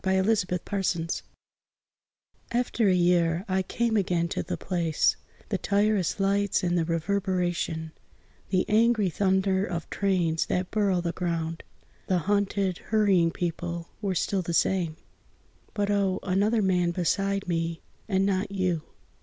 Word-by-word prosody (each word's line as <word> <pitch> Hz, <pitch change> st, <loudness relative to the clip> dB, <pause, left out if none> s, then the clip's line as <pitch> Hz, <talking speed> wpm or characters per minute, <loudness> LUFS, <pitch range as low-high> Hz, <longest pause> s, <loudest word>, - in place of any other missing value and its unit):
IN 190 Hz, 0 st, +2 dB
A 225 Hz, -, +5 dB
SUBWAY 180 Hz, -3 st, -1 dB
STATION 185 Hz, -4 st, -1 dB, 1.4 s
AFTER 235 Hz, -2 st, +1 dB
a -, -, +4 dB
year 175 Hz, 0 st, +2 dB
I 190 Hz, 0 st, +1 dB
came 230 Hz, +4 st, -1 dB
again 175 Hz, -4 st, +1 dB
to -, -, -2 dB
the -, -, -4 dB
place; 170 Hz, -4 st, +1 dB, 0.3 s
The 200 Hz, -3 st, -1 dB
tireless 205 Hz, -2 st, +1 dB
lights 200 Hz, 0 st, +1 dB
and 175 Hz, -1 st, +1 dB
the 165 Hz, -2 st, +1 dB
reverberation, 175 Hz, -2 st, -1 dB, 0.6 s
The 185 Hz, -1 st, +2 dB
angry 220 Hz, -3 st, +3 dB
thunder 190 Hz, +1 st, +2 dB
of 170 Hz, -4 st, -4 dB
trains 175 Hz, -5 st, +1 dB
that 180 Hz, 0 st, -1 dB
burrow 200 Hz, -4 st, +1 dB
the 170 Hz, -1 st, -1 dB
ground, 165 Hz, -2 st, -3 dB, 0.5 s
The 185 Hz, -, +2 dB
hunted, 200 Hz, 0 st, 0 dB
hurrying 200 Hz, -6 st, +3 dB
people 170 Hz, 0 st, -4 dB
were 195 Hz, -3 st, -1 dB
still 190 Hz, +3 st, 0 dB
the 170 Hz, -1 st, -2 dB
same 170 Hz, -4 st, +1 dB, 0.8 s
But 205 Hz, -1 st, 0 dB
oh, 195 Hz, -2 st, +1 dB
another 205 Hz, +4 st, +2 dB
man 180 Hz, -2 st, +2 dB
beside 195 Hz, +3 st, 0 dB
me 165 Hz, -1 st, -2 dB, 0.3 s
and 190 Hz, -1 st, +2 dB
not 195 Hz, +1 st, 0 dB
you! 185 Hz, -4 st, 0 dB
185 Hz, 140 wpm, -27 LUFS, 170-200 Hz, 1.4 s, A